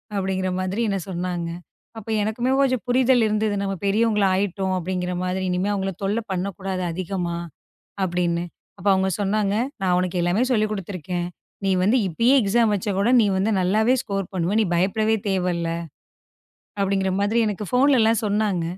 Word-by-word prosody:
அப்படிங்கற 190 -1 -1
மாதிரி 190 +5 -2
என்ன 195 - -1
சொன்னாங்க. 175 -1 -3 0.5
அப்போ 225 0 -6
எனக்குமே 240 +4 -1
கொஞ்சம் 255 -3 +1
புரிதல் 250 -1 +3
இருந்தது. 215 0 0
நம்ம 195 0 -2
பெரியவங்களாயிட்டோம் 195 -3 +1
அப்படிங்கற 180 0 -2
மாதிரி. 185 +1 -2
இனிமே 180 +3 0
அவங்கள 195 -1 -2
தொல்ல 205 +4 0
பண்ணக்கூடாது, 190 0 -3
அதிகமா 180 -1 -3 0.7
அப்படின்னு. 175 -1 0 0.3
அப்ப 175 - -10
அவங்க 190 0 +1
சொன்னாங்க, 200 0 +1 0.3
நான் 180 -2 +2
உனக்கு 180 -1 -1
எல்லாமே 175 +7 +1
சொல்லிக் 215 -2 +1
குடுத்துருக்கேன். 180 -3 -4 0.4
நீ 195 - +2
வந்து 210 +7 +3
இப்பயே 230 - +3
எக்ஸாம் 220 +2 +2
வச்சாக் 200 0 -2
கூட 205 +4 +2
நீ 210 - +3
வந்து 195 +4 +1
நல்லாவே 215 +7 +3
ஸ்கோர் 195 -6 -3
பண்ணுவ. 185 +2 -1
நீ - - +3
பயப்படவே 215 +5 +2
தேவைல்ல 180 -3 0 1.1
அப்படிங்கற 195 -1 +1
மாதிரி 220 +3 +2
எனக்குப் 210 0 -4
போன்லலாம் 250 -4 +4
சொன்னாங்க. 205 -4 0
195 Hz, 145 wpm, -23 LUFS, 185-215 Hz, 1.1 s, போன்லலாம்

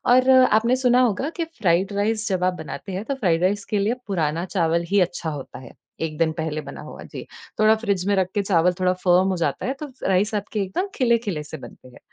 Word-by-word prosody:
और 255 +1 +4
आपने 255 -2 +5
सुना 255 -1 +3
होगा 245 +5 +1
कि 330 - +1
फ्राइड 190 +1 +2
राइस 215 +2 0
जब 185 -1 0
आप 185 0 +2
बनाते 175 +4 -7
हैं 190 +3 -3
तो 275 - -2
फ्राइड 175 -9 +1
राइस 200 +2 +1
के 210 - +2
लिए 210 +4 +1
पुराना 170 -3 -1
चावल 170 -1 +2
ही 200 - +3
अच्छा 170 -2 -1
होता 140 -4 -7
है, 125 - -12 0.3
एक 155 -2 -3
दिन 160 -1 +2
पहले 155 -1 -3
बना - - -9
हुआ, - - -10
जी। - - -9 0.3
थोड़ा 215 +1 +5
फ्रिज 195 -3 0
में 205 - +3
रख 190 -2 +2
के 205 - +1
चावल 180 -2 +2
थोड़ा 185 0 +2
फर्म 180 +1 +5
हो 185 - -1
जाता 140 - -3
है 265 - -1
तो 300 - -4 0.2
राइस 195 +3 +2
आपके 210 +1 -3
एकदम 280 - -2
खिले-खिले 230 - +1
से 155 - -8
बनते 130 - -13
हैं, 125 - -16
190 Hz, 235 wpm, -23 LUFS, 170-220 Hz, 0.3 s, आपने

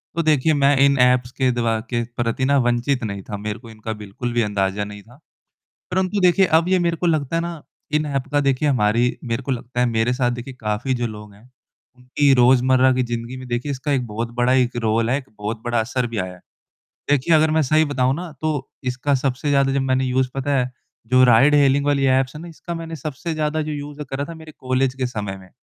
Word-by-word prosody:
तो 170 - +1
देखिए 155 0 +3
मैं 145 0 +3
इन 140 0 +3
ऐप्स 125 0 +2
के 130 - +3
द्व 120 -1 -2 0.2
के 120 -1 0
प्रति 120 +2 0
न 140 +1 +3
वंचित 120 +2 0
नहीं 100 -2 -4
था। 105 - -3
मेरे 105 +2 -5
को 115 -1 -13
इनका 110 0 -6
बिल्कुल 110 +5 -5
भी 120 - +2
अंदाज़ा 100 -1 -1
नहीं 105 0 -8
था। 120 +3 -19 0.7
परंतु 190 +2 0
देखिए 180 +1 +5
अब 170 - -4
ये 185 - +3
मेरे 170 -1 0
को 175 - 0
लगता 155 -2 0
है 165 - +1
न, 170 -3 -6 0.3
इन 150 0 +1
ऐप 140 -2 -2
का 145 - +2
देखिए 140 +1 +1
हमारी 120 0 +1
मेरे 115 0 -2
को 135 - -3
लगता 125 0 -4
है 125 - +4
मेरे 115 +1 +1
साथ 125 -1 +1
देखिए 125 +2 -6
काफ़ी 110 +5 -1
जो 120 -1 -1
लोग 105 -2 -10
हैं, 100 +2 -19 0.5
उनकी 130 +3 +1
रोज़मर्रा 130 +1 +4
की 130 0 +1
ज़िंदगी 120 +1 -5
में 130 0 -9
देखिए 120 +4 -2
इसका 140 +2 -3
एक 130 -3 +1
बहुत 115 +2 -4
बड़ा 125 +1 +3
एक 125 -2 +2
रोल 115 +1 +1
है, 130 - +2
एक 135 - -10
बहुत 110 +2 -4
बड़ा 120 -1 +1
असर 120 +2 -1
भी 115 -1 -6
आया 95 -1 -3
है। 90 - -15 0.7
देखिए 145 +3 +3
अगर 155 0 +3
मैं 160 0 +3
सही 155 +2 +3
बताऊँ 130 -2 +1
न, 175 -2 -7
तो 150 -4 -2
इसका 130 +3 0
सबसे 135 +2 -1
ज़्यादा 140 -1 +3
जब 140 - +1
मैंने 130 0 +1
यूज़ 130 0 +1
पता 140 +1 0
है 125 0 -1 0.4
जो 130 +2 +5
राइड-हेलिंग 140 +3 +5
वाली 140 -1 +2
ऐप्स 130 +1 +2
है 150 - -7
न, 170 - -8
इसका 170 +1 -8
मैंने 165 0 -6
सबसे 155 +3 -5
ज़्यादा 155 0 -1
जो 155 0 -4
यूज़ 145 0 -6
करा 135 +1 -3
था - - -6
मेरे 160 -1 -12
कॉलेज 130 0 0
के 130 - -2
समय 105 -5 -5
में। 95 -1 -16
130 Hz, 235 wpm, -21 LUFS, 120-145 Hz, 0.7 s, देखिए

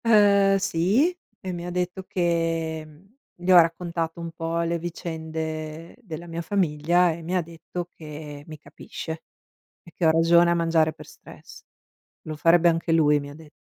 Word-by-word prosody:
Ehm, 200 -3 +5
sì, 200 - +1 0.2
e 185 - -5
mi 175 0 -5
detto 180 +1 -3
che 165 -2 -1
mhmm, 155 +7 -19 0.2
le 180 +1 +1
ho - - +8
raccontato 165 0 -2
un 170 0 -5
po' 165 +1 -3
le 170 0 -1
vicende 160 -1 -5
della 170 -6 -8
mia 170 0 -5
famiglia 175 -1 +2
e 165 +1 -6
mi 180 +3 -1
detto 170 +2 -7
che 150 -2 -9
mi 155 -1 -9
capisce. 160 +2 -8 0.6
E 170 - -15
che 175 - -1
ho 160 - +6
ragione 170 +1 +5
a - - +4
mangiare 165 -2 +2
per - - -13
stress. - - -14 0.6
Lo 155 -1 -6
farebbe 170 +2 +5
anche 165 0 -2
lui, 150 -2 +4
mi 140 - -8
ha 145 - -10
dett 155 0 -14
165 Hz, 165 wpm, -25 LUFS, 160-175 Hz, 0.6 s, ho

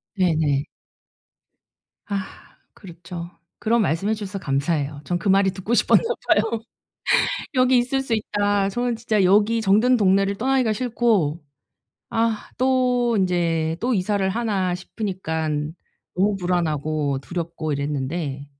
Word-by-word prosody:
네네. 155 -7 +1 1.4
아. 200 -3 -5 0.3
그렇죠. 170 -1 -9 0.3
그런 230 +1 +2
말씀 180 0 0
해 220 - +2
주셔서 205 -2 -5
감사해요. 145 -2 -1
전 175 - -1
그 185 +4 -2
말이 195 0 +4
듣고 195 +4 -4
싶었나 240 - +4 0.2
봐요. 230 -1 +2 0.9
"여기 255 0 +4
있을 265 +2 0
수 260 - -6
있다." 205 -2 0
저는 240 +2 -1
진짜 220 -3 +1
여기 210 +5 +4
정든 220 +5 +4
동네를 195 -1 +3
떠나기가 255 -1 +1
싫고 220 - +1 0.7
'아 225 -1 -1
또 250 -2 +2
인제 165 -3 0
또 245 +1 +1
이사를 195 0 0
하나.' 195 -4 0
싶으니깐 160 -6 -3 0.4
너무 200 +2 +2
불안하고 155 -5 -1
두렵고 170 -2 -4
이랬는데. 140 0 -3
195 Hz, 260 characters per minute, -23 LUFS, 165-225 Hz, 1.4 s, 말이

